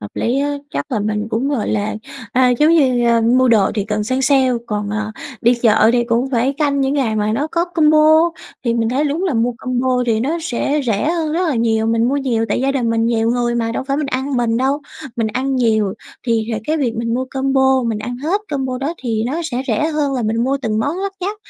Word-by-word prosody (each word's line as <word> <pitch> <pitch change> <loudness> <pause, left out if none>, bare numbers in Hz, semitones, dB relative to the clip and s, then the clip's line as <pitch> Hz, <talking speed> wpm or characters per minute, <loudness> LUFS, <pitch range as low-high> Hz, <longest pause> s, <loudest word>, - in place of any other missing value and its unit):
hợp 105 - -8
lý 245 +4 0
á. 290 0 -1 0.2
Chắc - - -4
là 220 - 0
mình 210 +1 -2
cũng, 230 +5 -1
gọi 265 -8 -1
là, 215 0 -1 0.4
à, 255 0 +4
giống 305 +2 +5
như, 255 -6 +3
ờ, 230 0 +4
mua 250 +3 +3
đồ 215 -5 +4
thì 205 -2 -1
cần 210 0 -2
săn 260 +4 -1
sale 265 -2 +3 0.2
còn, 210 -2 -3
ờ, 215 0 -2 0.3
đi 240 +2 +4
chợ 225 -2 +4
thì 240 -1 +2
cũng 235 +3 0
phải 255 +1 +1
canh 285 -2 +1
những 270 +1 +1
ngày 245 -7 0
mà 210 0 0
nó 280 +7 0
có 335 +2 0
combo, 315 -1 +4 0.3
thì 235 -1 +1
mình 230 -1 0
thấy 265 +5 0
đúng 300 +5 -1
là 355 -8 0
mua 235 +2 +1
combo 255 0 0
thì 220 -2 +1
nó 300 +8 -1
sẽ 295 0 -1
rẻ 225 +5 0
hơn 325 -3 -1
rất 350 +2 0
là 300 - 0
nhiều. 225 -1 +1
Mình 230 +1 +2
mua 275 - 0
nhiều 250 -5 0
tại 210 - 0
gia 270 +1 +1
đình 245 -4 0
mình 225 0 +1
nhiều 230 -1 +1
người 240 0 0
mà 230 -1 -1
đâu - - -3
phải 275 +1 -1
mình 300 0 -1
ăn 270 0 -2
mình 235 -2 +1
đâu, 270 +4 0 0.4
mình 230 -2 0
ăn 260 +5 -1
nhiều 220 -5 +1 0.3
thì 230 -2 +1
hệt 220 -1 -3
cái 310 - +1
việc 255 -7 -1
mình 230 0 -1
mua 255 +1 -1
combo, 265 -1 +2
mình 230 -3 -1
ăn 245 +3 -5
hết 325 +10 -1
combo 265 -3 -2
đó 285 +5 -3
thì 225 -3 -1
nó 295 +7 -2
sẽ 260 -4 -2
rẻ 245 +4 +1
hơn 300 -3 -1
là 250 - -1
mình 225 +2 0
mua 270 +2 +1
từng 215 -2 -1
món 285 +9 -1
lắt 395 0 -2
nhắt. 400 +4 -3
250 Hz, 255 wpm, -18 LUFS, 225-280 Hz, 0.4 s, giống